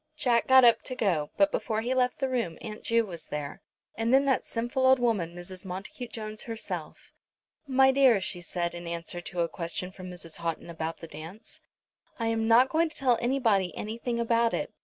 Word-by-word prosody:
Jack 240 Hz, -5 st, +2 dB
got 260 Hz, -1 st, +8 dB
up 235 Hz, -, +5 dB
to 255 Hz, -, -5 dB
go, 175 Hz, -11 st, 0 dB
but 295 Hz, 0 st, +4 dB
before 220 Hz, -1 st, -1 dB
he 245 Hz, +3 st, -1 dB
left 250 Hz, -1 st, +1 dB
the 270 Hz, -, 0 dB
room 235 Hz, -11 st, -2 dB
Aunt 215 Hz, -1 st, -7 dB
Ju 230 Hz, 0 st, +2 dB
was 170 Hz, -5 st, -9 dB
there, 150 Hz, -1 st, -5 dB, 0.3 s
and 225 Hz, +1 st, 0 dB
then 270 Hz, +2 st, +5 dB
that 265 Hz, -2 st, +1 dB
sinful 240 Hz, +3 st, 0 dB
old 260 Hz, 0 st, +7 dB
woman 210 Hz, -9 st, 0 dB
Mrs. 180 Hz, +1 st, -7 dB
Montacute 195 Hz, +6 st, -7 dB
Jones 215 Hz, -1 st, -6 dB
herself. 225 Hz, -1 st, -6 dB, 0.5 s
"My 265 Hz, 0 st, +5 dB
dear," 265 Hz, -5 st, +5 dB
she 185 Hz, -2 st, -2 dB
said 175 Hz, 0 st, -2 dB
in 175 Hz, 0 st, -7 dB
answer 170 Hz, +1 st, -5 dB
to 175 Hz, 0 st, -3 dB
a 170 Hz, -, +2 dB
question 170 Hz, +2 st, -4 dB
from 185 Hz, -1 st, -9 dB
Mrs. 170 Hz, -2 st, -10 dB
Houghton 170 Hz, 0 st, -4 dB
about 165 Hz, 0 st, -5 dB
the 165 Hz, -, -7 dB
dance, 160 Hz, +8 st, -10 dB, 0.6 s
"I 230 Hz, -1 st, -1 dB
am 225 Hz, 0 st, 0 dB
not 240 Hz, +3 st, +6 dB
going 325 Hz, +1 st, +2 dB
to 310 Hz, -, -9 dB
tell 250 Hz, -4 st, +2 dB
anybody 230 Hz, -8 st, +1 dB
anything 235 Hz, +2 st, -3 dB
about 230 Hz, 0 st, +2 dB
it. -, -, -4 dB
225 Hz, 200 wpm, -28 LUFS, 175-250 Hz, 0.6 s, got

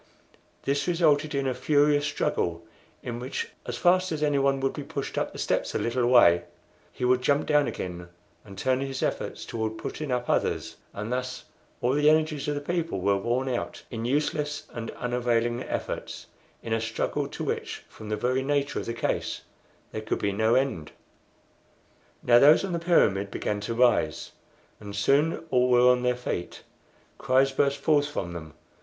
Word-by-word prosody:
This 140 Hz, +3 st, 0 dB
resulted 155 Hz, -4 st, +2 dB
in 140 Hz, 0 st, 0 dB
a 130 Hz, -, 0 dB
furious 145 Hz, +1 st, +2 dB
struggle, 85 Hz, -, -1 dB, 0.4 s
in 120 Hz, -1 st, -4 dB
which, 130 Hz, +3 st, -4 dB, 0.2 s
as -, -, -3 dB
fast 185 Hz, +1 st, +3 dB
as 155 Hz, -1 st, -2 dB
anyone 140 Hz, -2 st, +2 dB
would 135 Hz, 0 st, 0 dB
be 150 Hz, -, -5 dB
pushed 140 Hz, 0 st, -5 dB
up -, -, -1 dB
the -, -, -10 dB
steps -, -, -1 dB
a -, -, +3 dB
little 120 Hz, +1 st, 0 dB
way, 85 Hz, -9 st, +6 dB, 0.5 s
he 125 Hz, -, -3 dB
would 125 Hz, 0 st, +3 dB
jump 140 Hz, +3 st, +2 dB
down 150 Hz, -3 st, +3 dB
again 90 Hz, -4 st, -5 dB, 0.4 s
and 100 Hz, -2 st, -12 dB
turn 130 Hz, +5 st, +1 dB
his 135 Hz, -1 st, -3 dB
efforts -, -, -3 dB
toward 110 Hz, -1 st, -3 dB
putting 155 Hz, -2 st, -5 dB
up 125 Hz, -1 st, -1 dB
others; -, -, -1 dB
and 105 Hz, +4 st, -4 dB
thus 130 Hz, 0 st, -3 dB, 0.4 s
all 125 Hz, +2 st, +2 dB
the 150 Hz, +1 st, +4 dB
energies 155 Hz, -2 st, +1 dB
of 145 Hz, -, 0 dB
the 145 Hz, -, -3 dB
people 165 Hz, -, -2 dB
were 100 Hz, +2 st, +2 dB
worn 120 Hz, +6 st, -1 dB
out 125 Hz, -2 st, -3 dB
in 115 Hz, -2 st, -4 dB
useless 150 Hz, +3 st, -1 dB
and 115 Hz, -1 st, -5 dB
unavailing 120 Hz, -1 st, 0 dB
efforts -, -, -5 dB, 0.4 s
in 115 Hz, -, -2 dB
a 115 Hz, -, 0 dB
struggle 115 Hz, 0 st, -2 dB
to -, -, -6 dB
which, -, -, -3 dB
from 110 Hz, -, -11 dB
the 105 Hz, -, -1 dB
very 130 Hz, +4 st, 0 dB
nature 140 Hz, +1 st, 0 dB
of -, -, -6 dB
the 115 Hz, -, -3 dB
case, -, -, -2 dB, 0.5 s
there 110 Hz, -, -4 dB
could 110 Hz, -, -2 dB
be 100 Hz, -, -1 dB
no 110 Hz, +4 st, +2 dB
end. 130 Hz, -, 0 dB, 1.3 s
Now 120 Hz, 0 st, +6 dB
those 150 Hz, +8 st, +6 dB
on 190 Hz, -, -4 dB
the 170 Hz, -, 0 dB
pyramid 100 Hz, -, +2 dB
began 105 Hz, +1 st, -2 dB
to 115 Hz, +3 st, -4 dB
rise, 120 Hz, -1 st, +2 dB, 0.5 s
and 100 Hz, -1 st, -8 dB
soon 140 Hz, +11 st, +2 dB
all 125 Hz, 0 st, +3 dB
were 125 Hz, 0 st, +5 dB
on 125 Hz, 0 st, +1 dB
their 125 Hz, 0 st, +1 dB
feet. 90 Hz, -8 st, -5 dB, 0.6 s
Cries 135 Hz, 0 st, +3 dB
burst 140 Hz, +1 st, +1 dB
forth 145 Hz, -2 st, +2 dB
from 85 Hz, -12 st, -4 dB
them. 80 Hz, -2 st, -9 dB
125 Hz, 180 wpm, -27 LUFS, 115-145 Hz, 1.3 s, way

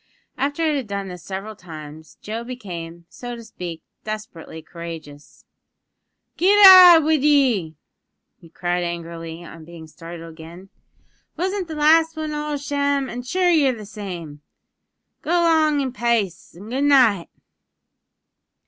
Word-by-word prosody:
After 285 Hz, +5 st, -2 dB
it 305 Hz, -2 st, +1 dB
had 265 Hz, -5 st, -3 dB
done 200 Hz, -1 st, -5 dB
this 180 Hz, -1 st, -9 dB
several 195 Hz, +4 st, -7 dB
times 155 Hz, -3 st, -12 dB
Joe 225 Hz, +2 st, -5 dB
became, 175 Hz, -9 st, -8 dB
so 245 Hz, +4 st, -8 dB
to 230 Hz, -, -11 dB
speak, 180 Hz, -7 st, -8 dB, 0.2 s
desperately 210 Hz, -7 st, -8 dB
courageous. 165 Hz, -4 st, -11 dB, 0.9 s
"Git 390 Hz, +4 st, +4 dB
out 360 Hz, -4 st, +10 dB
wid 310 Hz, -2 st, +1 dB
ye!" 250 Hz, -, +2 dB, 0.6 s
he 165 Hz, -, -17 dB
cried 175 Hz, +1 st, -2 dB
angrily 170 Hz, -1 st, -6 dB
on 165 Hz, -1 st, -12 dB
being 165 Hz, 0 st, -12 dB
startled 165 Hz, +1 st, -11 dB
again, 170 Hz, +4 st, -13 dB, 0.7 s
"wasn't 375 Hz, +1 st, -2 dB
the 320 Hz, -, -7 dB
last 320 Hz, +2 st, +3 dB
wan 310 Hz, -1 st, -4 dB
all 300 Hz, 0 st, -4 dB
a -, -, -1 dB
sham? 285 Hz, -1 st, -1 dB
an' 245 Hz, -, -5 dB
sure 355 Hz, +8 st, +1 dB
ye're 280 Hz, -6 st, +3 dB
the 210 Hz, -, -9 dB
same. 175 Hz, -8 st, -8 dB, 0.8 s
Go -, -, -9 dB
'long 320 Hz, -4 st, +3 dB
in 260 Hz, -2 st, -3 dB
pace 230 Hz, -10 st, -2 dB
an' 205 Hz, +5 st, -11 dB
goodnight!" 260 Hz, -9 st, +3 dB
215 Hz, 140 wpm, -21 LUFS, -, 0.9 s, out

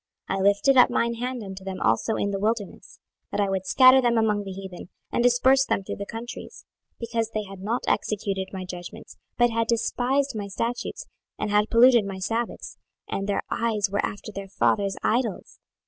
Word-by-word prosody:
26:020:023 195 Hz, -, 0 dB
I -, -, -1 dB
lifted 200 Hz, +7 st, +3 dB
up 250 Hz, -, +7 dB
mine 235 Hz, -1 st, 0 dB
hand 245 Hz, 0 st, -4 dB
unto 190 Hz, -1 st, -8 dB
them 190 Hz, -1 st, -5 dB
also 110 Hz, -, +1 dB
in 200 Hz, -, -1 dB
the 195 Hz, -, -2 dB
wilderness, 215 Hz, 0 st, -3 dB, 0.3 s
that -, -, -3 dB
I 200 Hz, -1 st, +1 dB
would 190 Hz, -1 st, -2 dB
scatter 260 Hz, 0 st, +7 dB
them 240 Hz, -2 st, +2 dB
among 210 Hz, -2 st, +1 dB
the 195 Hz, -, -6 dB
heathen, 190 Hz, -2 st, -9 dB, 0.2 s
and -, -, 0 dB
disperse 250 Hz, +2 st, +4 dB
them 195 Hz, -, -1 dB
through -, -, -6 dB
the 200 Hz, -, -6 dB
countries; 230 Hz, +2 st, -8 dB, 0.3 s
26:020:024 -, -, -53 dB
Because 230 Hz, -1 st, -1 dB
they 215 Hz, -, 0 dB
had 195 Hz, -1 st, -11 dB
not 225 Hz, +5 st, -2 dB
executed 195 Hz, -2 st, -1 dB
my 190 Hz, -1 st, -6 dB
judgments, 180 Hz, -1 st, -9 dB, 0.2 s
but 240 Hz, -1 st, +4 dB
had 230 Hz, 0 st, 0 dB
despised 255 Hz, +4 st, 0 dB
my 205 Hz, -2 st, -4 dB
statutes, 235 Hz, -, -4 dB, 0.3 s
and 215 Hz, -, -3 dB
had 210 Hz, +1 st, +2 dB
polluted 235 Hz, -1 st, +6 dB
my 195 Hz, -1 st, -5 dB
sabbaths, 225 Hz, +5 st, -4 dB, 0.3 s
and 195 Hz, +1 st, -3 dB
their 200 Hz, -, 0 dB
eyes 215 Hz, -4 st, 0 dB
were 200 Hz, -, 0 dB
after 205 Hz, +1 st, -5 dB
their 200 Hz, -1 st, -7 dB
fathers' 200 Hz, 0 st, +1 dB
idols. 230 Hz, -3 st, -1 dB
215 Hz, 195 wpm, -25 LUFS, 195-235 Hz, 0.3 s, up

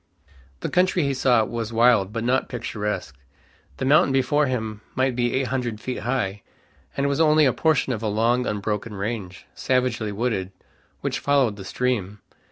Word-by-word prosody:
The -, -, -2 dB
country 180 Hz, -1 st, +2 dB
he 140 Hz, -1 st, 0 dB
saw 125 Hz, -3 st, +3 dB
was 115 Hz, 0 st, -4 dB
wild 115 Hz, -4 st, +4 dB
but 115 Hz, +1 st, -3 dB
not 130 Hz, +2 st, +1 dB
picturesque. 105 Hz, -, -4 dB, 0.6 s
The -, -, -2 dB
mountain 140 Hz, 0 st, +5 dB
before 135 Hz, +2 st, +2 dB
him 110 Hz, -4 st, -3 dB
might 130 Hz, -1 st, +1 dB
be 120 Hz, -1 st, 0 dB
eight 130 Hz, -2 st, 0 dB
hundred 120 Hz, -4 st, -2 dB
feet 130 Hz, +2 st, -4 dB
high, 105 Hz, -6 st, -2 dB, 0.6 s
and 140 Hz, 0 st, +1 dB
was 140 Hz, +2 st, +1 dB
only 155 Hz, -1 st, +5 dB
a 130 Hz, -, +3 dB
portion 155 Hz, -5 st, +1 dB
of 110 Hz, -, -4 dB
a 110 Hz, -, -1 dB
long 115 Hz, +4 st, +1 dB
unbroken 105 Hz, +1 st, -3 dB
range, 100 Hz, -4 st, -5 dB
savagely 125 Hz, -4 st, 0 dB
wooded, 100 Hz, -3 st, -2 dB, 0.5 s
which -, -, -2 dB
followed 135 Hz, -7 st, +2 dB
the 100 Hz, -, -9 dB
stream. 105 Hz, -4 st, -2 dB
120 Hz, 170 wpm, -24 LUFS, 105-130 Hz, 0.6 s, mountain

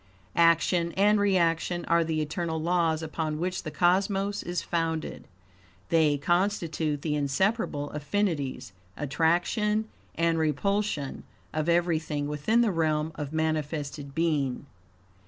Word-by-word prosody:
Action 170 Hz, +1 st, +3 dB
and 205 Hz, +2 st, +4 dB
reaction 175 Hz, -3 st, +1 dB
are 170 Hz, 0 st, +3 dB
the 160 Hz, -1 st, -1 dB
eternal 160 Hz, +1 st, -3 dB
laws 165 Hz, -1 st, +1 dB
upon 155 Hz, -1 st, -3 dB
which 180 Hz, +3 st, -2 dB
the 155 Hz, -, -5 dB
cosmos 195 Hz, +5 st, +1 dB
is 175 Hz, 0 st, -3 dB
founded. 165 Hz, -2 st, -2 dB, 0.6 s
They 155 Hz, -3 st, +3 dB
constitute 165 Hz, -3 st, 0 dB
the 155 Hz, -, 0 dB
inseparable 145 Hz, -, 0 dB
affinities, 150 Hz, -, -2 dB, 0.2 s
attraction 175 Hz, -, +1 dB, 0.3 s
and 165 Hz, 0 st, +1 dB
repulsion, 160 Hz, 0 st, -1 dB, 0.3 s
of 155 Hz, +1 st, -1 dB
everything 160 Hz, -4 st, +1 dB
within 150 Hz, +11 st, +1 dB
the 230 Hz, -3 st, +2 dB
realm 155 Hz, -2 st, 0 dB
of 145 Hz, -2 st, -5 dB
manifested 150 Hz, -3 st, -2 dB
being. 145 Hz, -6 st, 0 dB
165 Hz, 115 wpm, -27 LUFS, 150-180 Hz, 0.6 s, and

